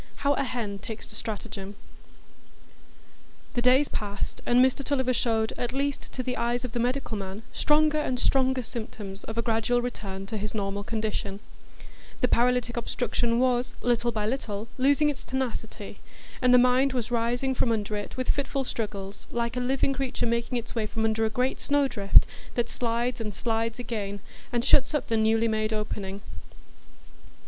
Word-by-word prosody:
How 285 - +5
a - - 0
Hen 225 -6 -3
Takes 220 +2 -7
to 210 - -11
Stratagem 205 -2 -6 1.8
The 240 - +1
days 255 +4 +5
passed, 205 -1 -4
and 240 - +4
Mr 260 +1 0
Tulliver 260 -2 +1
showed, 225 -2 +1
at 245 - -2
least 280 +1 -2
to 255 - -3
the 250 0 -2
eyes 240 +1 0
of 250 - -5
the 240 - -2
medical 250 0 0
man, 195 +1 -5
stronger 305 0 +3
and 255 -4 -1
stronger 260 -1 +2
symptoms 210 -4 -6
of 225 - -6
a 230 - +1
gradual 230 +1 +2
return 200 -6 -4
to 215 +3 -4
his 210 +2 -3
normal 200 -1 -2
condition; 210 -2 -2 0.8
the 250 - +3
paralytic 245 0 +2
obstruction 235 0 0
was, 250 -1 +2
little 240 0 +2
by 215 -2 -1
little, 220 -3 -2
losing 285 +3 +4
its 280 - -8
tenacity, 230 -5 -4 0.4
and 250 -1 +5
the 250 - +8
mind 250 +2 +4
was 245 -2 -2
rising 245 +3 +1
from 245 -2 +1
under 210 -1 -1
it 205 +4 -5
with 255 - +2
fitful 275 -1 -1
struggles, 205 -5 -4
like 235 0 -1
a - - 0
living 265 +2 +1
creature 265 -1 -1
making 235 +2 0
its 235 -1 -5
way 225 -2 -1
from 220 +1 -1
under 225 0 +2
a - - +1
great 250 +4 0
snowdrift, 270 -9 +4 0.3
that 240 -1 0
slides 240 0 -1
and 210 -3 -4
slides 225 0 -1
again, 210 -5 -3 0.3
and 240 0 0
shuts 275 +2 +5
up 295 - -1
the 230 - +2
newly 225 +1 +3
made 215 0 0
opening. 205 -2 -3
235 Hz, 175 wpm, -27 LUFS, 215-255 Hz, 1.8 s, the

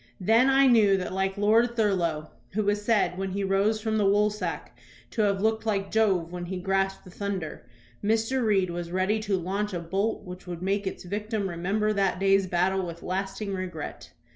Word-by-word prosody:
Then 225 +7 +4
I 270 0 +5
knew 215 -6 +5
that, 185 -1 -4
like 190 +1 -1
Lord 225 +4 +3
Thurlow, 175 -8 0 0.2
who 215 +2 0
was 205 0 +1
said, 205 -4 +1
when 195 -1 -3
he 200 0 -1
rose 195 +3 +2
from 220 0 -1
the - - +2
woolsack, 210 +2 0 0.4
to 225 - -1
have 200 -1 +1
looked 220 0 0
like 200 -2 -1
Jove 190 -7 +2
when 175 -1 -5
he 185 +1 -4
grasped 195 +1 -1
the 185 - -13
thunder, 190 -9 -5 0.4
Mr. 225 +4 +1
Reed 195 -5 +2
was 170 0 -5
ready 190 +4 +1
to 205 -3 0
launch 195 +3 -2
a - - -1
bolt 195 +6 -2
which 180 0 -10
would 175 0 -6
make 200 +1 0
its - - -5
victim 205 +2 -3
remember 195 +5 0
that 195 -3 +1
day's 195 0 +3
battle 185 +2 +1
with 170 -1 -7
lasting 195 +2 -3
regret. 180 -5 -6
195 Hz, 190 wpm, -27 LUFS, 185-215 Hz, 0.4 s, I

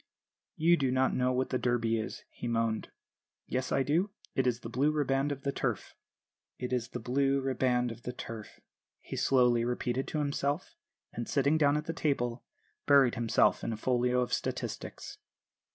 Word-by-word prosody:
"'You 170 +2 +4
do 135 -4 +1
not 130 +1 +2
know 125 0 +2
what 130 +1 -1
the 130 - +1
Derby 115 -2 +1
is,' 110 - -5
he - - -6
moaned. 115 -1 0 0.6
"'Yes, 130 0 -2
I 135 - +3
do; 165 +9 +1 0.2
it 130 -1 +1
is 120 -1 0
the - - -6
Blue 130 +6 +1
Riband 140 -1 +1
of 140 -1 -5
the 140 - 0
Turf.' - - -3 0.6
"'It 125 0 -4
is 120 -2 0
the 125 - -6
Blue 135 +4 +1
Riband 125 -2 +1
of 115 - -10
the 125 - -4
Turf,' 115 -3 -8 0.4
he - - -7
slowly 125 -3 +3
repeated 125 +2 -1
to - - -3
himself; 145 - -1 0.4
and, 120 - -5
sitting 140 +2 +3
down 145 -2 +3
at 150 - -4
a 165 - -2
table, 125 -7 -1 0.4
buried 140 -4 +6
himself 120 -3 +2
in - - -1
a 110 - -3
folio 125 +1 +1
of 125 - -2
statistics." - - -4
130 Hz, 180 wpm, -31 LUFS, 120-140 Hz, 0.6 s, buried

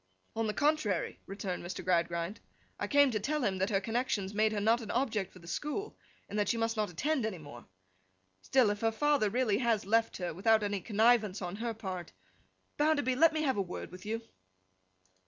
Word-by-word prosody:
'On 225 0 0
the 210 - -1
contrary,' 295 -9 +1
returned 195 -2 -4
Mr. 175 +1 -6
Gradgrind. 170 +1 0 0.4
'I - - -2
came 285 -2 +5
to 215 - 0
tell 295 +6 -1
him 190 -4 0
that 190 - +1
her 195 -3 +2
connections 215 -2 -1
made 215 +1 +2
her 210 - -1
not 225 +4 +3
an 220 - -8
object 225 -6 -1
for - - -15
the 170 -1 -14
school, 300 - -3 0.3
and 205 +1 -3
that 205 - +1
she 235 - +1
must 225 0 0
not 215 -1 0
attend 270 - -1
any 215 -4 -2
more. 145 -6 -12 0.7
Still, 250 - +3
if 205 - -5
her 225 0 +2
father 285 -2 +2
really 225 -2 +1
has 230 -5 +1
left 225 +3 +2
her, 180 -3 -3
without 220 +5 +3
any 200 -1 -1
connivance 220 -1 +3
on 180 +1 -5
her 230 0 -3
part—Bounderby, 255 - -3
let 325 +5 +6
me 310 0 -1
have 265 -6 +1
a - - +2
word 180 -2 -6
with 185 - -11
you. 225 +2 -3
215 Hz, 200 wpm, -32 LUFS, 195-245 Hz, 0.7 s, let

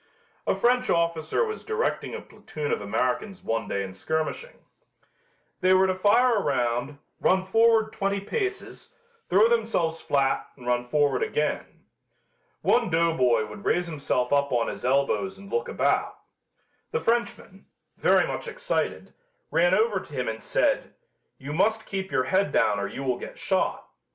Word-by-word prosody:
A - - +2
French 250 +1 +2
officer 170 - +1
was 435 0 -5
directing 450 +2 -2
a - - -6
platoon 150 -1 -6
of - - -1
Americans 125 - -2
one 115 -2 -2
day 100 - -2
in 95 -1 -7
skirmishing. 160 - -4 0.9
They 185 0 +4
were 190 0 +5
to 185 - +1
fire 215 +5 +3
a - - +1
round, 125 0 -1 0.2
run 185 0 +2
forward 225 +2 +3
twenty 200 0 -1
paces, 385 - -4 0.3
throw 205 +5 +5
themselves 220 -9 0
flat 135 -1 +1
and 125 - -13
run 125 0 0
forward 145 -1 +2
again. 150 0 -2 0.8
One 235 -4 +3
doughboy 160 -10 +2
would 105 -1 -10
raise 175 0 +1
himself 145 -5 -1
up 140 0 +2
on 120 -2 +1
his - - -7
elbows 140 +9 +1
and 200 0 -13
look 470 0 -1
about. - - 0 0.7
The 465 - -1
Frenchman, 230 - -2 0.3
very - - +4
much - - -5
excited, - - -3 0.4
ran 175 +2 +4
over 215 -3 +2
to 150 - -13
him 125 -1 -2
and 110 0 -4
said, - - 0 0.4
"You 140 +2 -7
must 220 +6 +1
keep 190 -1 -4
your 130 - +2
head 190 +9 +1
down 105 -1 +2
or 100 - -2
you 135 - -6
will 125 -2 -1
get - - -9
shot. - - -1
170 Hz, 160 wpm, -26 LUFS, 130-210 Hz, 0.9 s, were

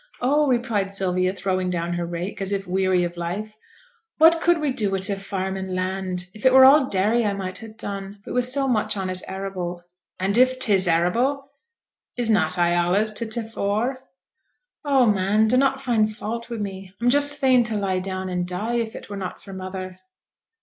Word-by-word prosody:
'Oh!' 290 +4 +2
replied 235 -6 0
Sylvia, 185 -2 0
throwing 185 -1 -2
down 170 -1 -2
her 175 -1 -3
rake, 175 +4 -5
as 195 0 -1
if 195 -1 -2
weary 185 0 +1
of 175 0 -4
life. 190 +6 -4 0.6
'What 330 +1 +6
could 345 0 +3
we 300 -3 -1
do 220 -6 -1
wi' 195 - -1
t' 190 +2 +1
farm 195 -1 -4
and 190 -1 -4
land? 185 -1 -3
If 215 - -12
it 260 -1 +5
were 265 0 +9
all 270 0 +6
dairy 210 +5 +2
I 205 -2 0
might 185 -2 -5
ha' 220 -1 -11
done, 200 0 -6
but - - -6
wi' 250 - +2
so 265 +3 +2
much 215 -4 0
on 190 -1 -2
it 185 0 -4
arable.' 185 -2 -5 0.4
'And 195 +5 +1
if 255 0 +4
'tis 200 -7 +4
arable 245 +12 +1 0.7
is 235 -2 +1
not 180 -4 +2
I 175 -1 +3
allays 175 +5 +1
to 230 +2 -2
t' 225 +1 -3
fore?' 225 +4 -2 0.8
'Oh, 275 -4 +3
man, 210 +1 +2
dunnot 270 +3 +2
find 230 -5 +1
fault 230 +2 -6
wi' 235 - -4
me! 195 -2 -7
I'm 240 +1 +2
just 285 +1 +5
fain 255 -2 +4
to 220 -2 -2
lie 190 -2 -1
down 185 0 -4
and 180 -1 -2
die, 210 +7 -2
if 225 -1 -3
it - - -9
were 205 - -7
not 185 -2 -6
for 195 - -12
mother.' 185 0 -7
200 Hz, 200 wpm, -23 LUFS, 185-240 Hz, 0.8 s, were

